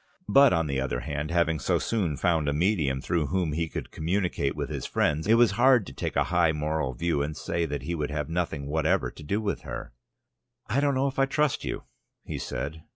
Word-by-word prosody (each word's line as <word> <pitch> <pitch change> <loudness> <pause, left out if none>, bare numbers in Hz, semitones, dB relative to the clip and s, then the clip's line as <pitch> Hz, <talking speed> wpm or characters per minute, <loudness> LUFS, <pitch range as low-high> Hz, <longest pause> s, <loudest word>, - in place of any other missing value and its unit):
But, 140 -1 +6
on 80 -2 +2
the 70 -2 -1
other 65 -2 -2
hand, 75 +3 -3
having 85 -2 +1
so 65 - +1
soon 90 -11 -1
found 80 -5 +1
a - - 0
medium 75 -5 +1
through 80 -1 0
whom 85 0 0
he 80 +1 -1
could - - -6
communicate 85 -4 -1
with - - -3
his - - -4
friends, 75 +5 0
it 110 - +6
was 120 -2 +5
hard 120 +1 +4
to 70 - -9
take - - -4
a - - +4
high 85 -2 +4
moral 75 -3 -1
view, 85 +1 0
and 75 +1 -3
say 85 -1 -1
that 70 -3 -4
he 85 +4 -3
would 75 -3 -2
have 75 -1 -2
nothing 80 -3 -2
whatever 80 +2 +1
to - - -13
do 100 +8 -1
with 105 -2 -2
her. - - -7 0.7
"I 120 - 0
don't 140 -1 +2
know 130 +1 +1
if 135 0 -2
I 135 - +4
trust 150 0 +1
you," - - -4 0.4
he - - -5
said. 80 +3 -4
80 Hz, 225 wpm, -27 LUFS, 75-100 Hz, 0.7 s, But